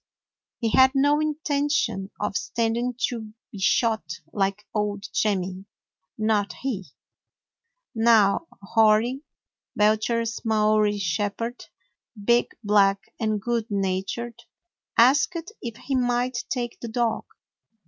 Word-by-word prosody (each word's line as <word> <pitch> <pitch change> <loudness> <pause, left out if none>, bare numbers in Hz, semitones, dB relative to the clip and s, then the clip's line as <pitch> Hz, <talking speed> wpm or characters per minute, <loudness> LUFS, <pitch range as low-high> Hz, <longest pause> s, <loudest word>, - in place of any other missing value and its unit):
He 230 -3 -1
had 260 +2 +6
no 290 +2 +4
intention 290 -9 0
of - - -2
standing 235 +5 -1
to 220 -3 -7 0.2
be 200 - -9
shot 220 +3 +2 0.3
like 195 +1 -1
old 205 -1 -2
Jemmy; 190 -2 -1 0.5
not 210 -3 +1
he. 215 -9 -4 1.1
New 225 +4 +4 0.2
Hori, 225 +5 +3 0.5
Belcher's 220 +2 +1
Maori 215 -2 +2
shepherd, 205 +6 -2 0.5
big, 235 +4 +3 0.2
black, 200 -1 +2
and 215 -2 0
good 235 +1 -2
natured, 200 +4 -2 0.6
asked 295 - +3
if 235 -3 -5
he 275 - -5
might 245 0 0
take 240 -2 -3
the 235 - -6
dog. 230 0 -1
225 Hz, 105 wpm, -25 LUFS, 205-245 Hz, 1.1 s, had